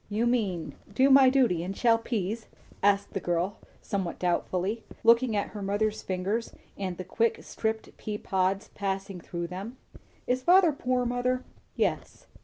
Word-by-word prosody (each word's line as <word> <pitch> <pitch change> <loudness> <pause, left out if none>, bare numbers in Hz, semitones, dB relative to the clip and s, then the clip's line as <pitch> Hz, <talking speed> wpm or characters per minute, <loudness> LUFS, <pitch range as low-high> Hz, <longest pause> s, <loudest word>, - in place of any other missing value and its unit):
"You 215 +3 0
mean, 210 -9 0 0.2
do 265 +6 +4
my 265 -1 +8
duty 245 -11 +3
and 190 +3 -5
shell 230 -2 +4
peas?" 220 -1 -3 0.3
asked 200 0 +2
the - - -1
girl 175 +2 -1 0.2
somewhat 190 -4 -2
doubtfully, 185 +4 -1 0.2
looking 230 0 +5
at 205 - 0
her 210 - -7
mother's 205 +2 0
fingers 195 +5 -2 0.2
and 185 -3 -4
the 185 - -4
quick 225 +5 0
stripped 220 0 -3
pea 210 -1 -4
pods 190 0 0
passing 195 -2 -3
through 170 +1 -4
them. 195 +8 -7 0.5
"Is 255 +1 0
father 355 +3 +6
poor, 250 -3 0
mother?" 250 +1 0 0.3
"Yes." - - -2
210 Hz, 155 wpm, -28 LUFS, 190-240 Hz, 0.5 s, my